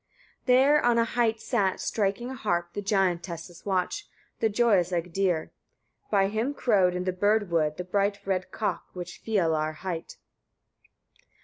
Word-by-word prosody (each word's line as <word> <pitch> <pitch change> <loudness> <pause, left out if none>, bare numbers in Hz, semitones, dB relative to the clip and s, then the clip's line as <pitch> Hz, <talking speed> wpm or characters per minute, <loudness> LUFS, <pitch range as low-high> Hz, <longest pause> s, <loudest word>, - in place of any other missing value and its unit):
34. 250 - +6
There 285 +3 +5
on 240 -1 +4
a 230 - +4
height 230 -1 +1
sat, 200 -7 0
striking 215 +4 -1
a - - -4
harp, 175 -8 -2
the 205 - -3
giantess's 175 -3 -1
watch, 190 - -1 0.3
the 225 - +2
joyous 205 -5 +3
Egdir; 175 -1 -1 0.6
by 195 -2 +3
him 225 +8 -1
crowed, 195 -9 +3
in 180 - -2
the 185 0 -1
bird 205 +1 +1
wood, 155 -2 +1
the 180 - -3
bright 200 +2 0
red 185 -2 -1
cock, 190 -6 -2
which 180 -1 -8
Fialar 160 -7 +1
hight. 170 -1 -5
195 Hz, 150 wpm, -27 LUFS, 175-220 Hz, 0.6 s, 34